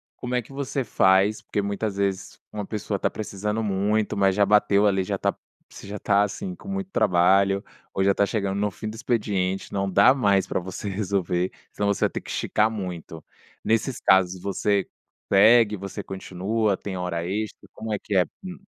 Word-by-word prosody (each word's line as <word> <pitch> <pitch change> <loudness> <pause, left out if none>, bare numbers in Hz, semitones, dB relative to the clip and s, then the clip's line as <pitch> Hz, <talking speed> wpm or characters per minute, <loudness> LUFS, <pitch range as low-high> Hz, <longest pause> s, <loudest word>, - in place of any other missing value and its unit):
Como 125 0 -4
é 125 - +1
que 120 - -15
você 135 0 -2
faz? 95 +1 +3
Porque 105 - -2
muitas 100 0 -3
vezes, 100 -1 -2
uma 105 -1 -4
pessoa 105 -1 -3
tá - - 0
precisando 105 +1 -3
muito, 105 +1 0
mas 95 -1 +3
já 100 0 +4
bateu 105 0 +4
ali 95 -1 +2
já - - -2
tá - - 0 0.3
você - - -12
já 105 - -5
tá 100 0 +3
assim 180 - -4
com 185 - -14
muito 195 -1 -3
trabalho, 95 - +3 0.3
ou 95 - +1
já 100 0 +4
tá 100 - +2
chegando 100 -2 -2
no 105 0 +1
fim 105 +3 -7
do 110 - -8
expediente, 100 -5 -1
não 100 -1 -1
dá 100 +5 +6
mais 100 -8 +2
para - - -2
você 95 +3 -6
resolver, 95 -2 -1 0.2
se - - -25
não 105 - +1
você 100 - +2
vai - - +1
ter - - -5
que - - -13
esticar 110 +1 +1
muito. 90 -6 -6 0.4
Nesses 115 +3 0
casos 95 -1 +3
você 100 0 0 0.5
segue, 105 +2 +6
você 100 +2 -6
continua, 95 +3 -1
tem 95 -1 -6
hora 90 -2 -3
extra, 100 +1 -4
como 110 -1 -5
é - - 0
que 100 - -3
é? 90 - +6 0.2
Hum. 185 -1 -7
100 Hz, 200 wpm, -24 LUFS, 95-110 Hz, 0.5 s, dá